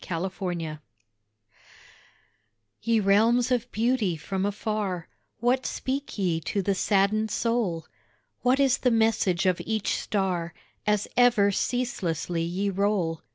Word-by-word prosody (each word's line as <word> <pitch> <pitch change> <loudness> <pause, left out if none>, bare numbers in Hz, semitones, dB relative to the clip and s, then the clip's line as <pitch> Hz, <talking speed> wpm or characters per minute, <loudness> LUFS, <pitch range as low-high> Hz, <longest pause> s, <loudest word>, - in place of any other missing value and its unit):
ANSWERED 175 -3 -3 2.0
Ye 230 -1 +2
realms 225 +5 +3
of 245 0 0
beauty 220 -6 +1
from 190 +5 -2
afar, 205 -4 -3 0.3
What 245 +3 +1
speak 275 0 -4
ye 175 -5 0
to 195 +4 -2
the 200 - +1
saddened 205 +3 +2
soul? 225 -10 -1 0.6
What 255 +2 +3
is 270 -1 +3
the 250 - +2
message 220 -6 +2
of 185 -2 +2
each 220 -2 -1
star 180 -5 -2 0.3
As 210 -1 +2
ever 240 -5 +5
ceaselessly 180 -8 -1
ye 185 +4 -1
roll? 190 -4 0
200 Hz, 115 wpm, -26 LUFS, 180-230 Hz, 2.0 s, ever